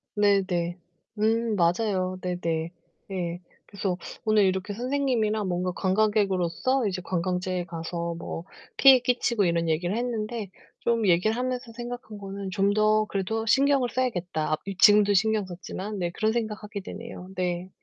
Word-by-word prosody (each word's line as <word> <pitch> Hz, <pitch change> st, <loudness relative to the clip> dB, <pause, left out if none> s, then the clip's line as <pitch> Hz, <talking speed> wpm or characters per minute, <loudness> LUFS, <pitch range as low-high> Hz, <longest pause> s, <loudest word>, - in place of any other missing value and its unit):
네네. 190 Hz, -4 st, +2 dB, 0.4 s
음 225 Hz, +1 st, +2 dB
맞아요. 185 Hz, +1 st, +1 dB
네네. 170 Hz, -2 st, -2 dB, 0.4 s
예. 175 Hz, -2 st, -3 dB, 0.3 s
그래서 195 Hz, -3 st, -3 dB, 0.3 s
오늘 215 Hz, -1 st, +4 dB
이렇게 190 Hz, +2 st, -1 dB
선생님이랑 235 Hz, -4 st, 0 dB
뭔가 180 Hz, 0 st, -1 dB
관광객으로서 205 Hz, +4 st, +1 dB
이제 185 Hz, -2 st, -3 dB
관광지에 180 Hz, 0 st, -1 dB
가서 170 Hz, 0 st, -4 dB
뭐 165 Hz, 0 st, -6 dB, 0.3 s
피해 270 Hz, -2 st, +8 dB
끼치고 245 Hz, -4 st, +1 dB
이런 170 Hz, -1 st, +1 dB
얘기를 175 Hz, +5 st, 0 dB
했는데 230 Hz, -3 st, -3 dB, 0.3 s
좀 230 Hz, -2 st, +1 dB
얘기를 185 Hz, +5 st, +3 dB
하면서 250 Hz, -1 st, -3 dB
생각한 240 Hz, -2 st, -7 dB
거는 195 Hz, 0 st, -6 dB
'좀 200 Hz, +1 st, +2 dB
더 215 Hz, 0 st, +3 dB
그래도 210 Hz, +3 st, -2 dB
신경을 270 Hz, +1 st, +3 dB
써야겠다.' 180 Hz, -12 st, -1 dB
앞 155 Hz, -, +1 dB
이 195 Hz, 0 st, -4 dB
지금도 205 Hz, 0 st, +6 dB
신경 215 Hz, +1 st, +2 dB
썼지만, 190 Hz, +3 st, -6 dB
네 175 Hz, -1 st, 0 dB
그런 215 Hz, +5 st, 0 dB
생각 220 Hz, -2 st, -3 dB
하게 210 Hz, -1 st, -6 dB
되네요. 200 Hz, -2 st, -8 dB
네. 180 Hz, 0 st, -2 dB
200 Hz, 325 characters per minute, -26 LUFS, 180-220 Hz, 0.4 s, 피해